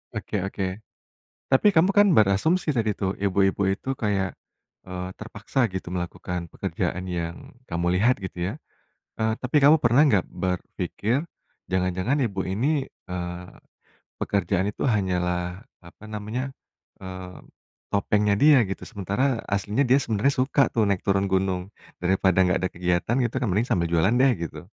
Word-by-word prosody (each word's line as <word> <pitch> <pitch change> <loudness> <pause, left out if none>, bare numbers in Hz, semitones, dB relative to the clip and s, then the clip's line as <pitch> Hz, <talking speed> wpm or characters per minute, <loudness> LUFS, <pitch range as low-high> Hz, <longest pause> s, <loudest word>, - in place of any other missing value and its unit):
Oke 100 -4 -3
oke. 100 0 -3 0.8
Tapi 130 +9 +4
kamu 180 +1 +4
kan 205 0 +6
berasumsi 150 - +3
tadi 110 -3 +1
tuh, 95 0 -1
ibu-ibu 100 0 +1
itu 130 +7 -3
kayak, 100 -4 -1 0.5
eee, 90 0 -5
terpaksa 105 +4 -5
gitu 95 -1 -5
melakukan 90 -1 -4
pekerjaan 90 +1 -3
yang 85 -1 -3 0.3
kamu 85 +1 0
lihat, 120 +7 +3
gitu 95 -1 -4
ya. - - -6 0.7
Eee, 110 0 +2
tapi 130 +4 +2
kamu 145 +3 +7
pernah 120 +5 +5
nggak 100 -8 +3
berpikir, 105 - -2 0.4
jangan-jangan 95 +7 0
ibu 100 -5 -3
ini, 135 +8 0 0.2
eee, 90 0 -5 0.7
pekerjaan 100 0 0
itu - - -7
hanyalah 90 -3 -1 0.2
apa 85 +4 -15
namanya, 110 +5 -4 0.5
eee, 95 -1 -8 0.5
topengnya 105 0 +2
dia, 145 -2 +6
gitu? 95 - -5
Sementara, 115 +4 -1
aslinya 100 +5 +1
dia 130 +3 +6
sebenarnya 115 +4 +1
suka 140 +1 +2
tuh 110 -2 +3
naik 100 -2 0
turun 100 0 +2
gunung. 95 0 -1 0.3
Daripada 95 +1 +3
nggak 90 - +2
ada 95 - +1
kegiatan 90 +6 0
gitu 120 - -2
kan, 125 - 0
mending 105 +6 +1
sambil 85 -2 +1
jualan 85 +6 +3
deh, 135 -1 +5
gitu. 85 -1 -5
100 Hz, 145 wpm, -25 LUFS, 90-120 Hz, 0.8 s, kamu